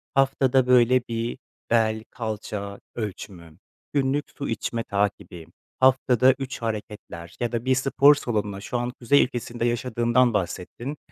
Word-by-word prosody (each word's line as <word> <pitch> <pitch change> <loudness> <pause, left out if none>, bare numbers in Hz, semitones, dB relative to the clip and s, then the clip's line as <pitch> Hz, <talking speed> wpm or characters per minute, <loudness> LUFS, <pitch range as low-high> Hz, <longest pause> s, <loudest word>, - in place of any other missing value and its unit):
haftada, 135 -1 +3
böyle, 125 0 +5
bir 115 +1 -3 0.3
bel, 110 -1 +2
kalça 105 -3 -5 0.2
ölçümü, 90 -7 -7 0.4
günlük 140 +1 +1
su 140 - -4
içme 115 +1 -2
takibi, 100 -4 -2 0.3
haftada 130 -1 +4
3 135 -2 -5
hareketler 105 -6 -6
ya 120 -1 -1
da 120 +1 -3
bir 130 - +3
spor 135 +2 +5
salonuna, 105 -7 -3
şu 120 - -3
an 120 +1 -2
kuzey 140 +4 +4
ülkesinde 120 -2 -4
yaşadığından 120 0 +2
bahsettin. 100 - -4
120 Hz, 130 wpm, -24 LUFS, 105-130 Hz, 0.4 s, böyle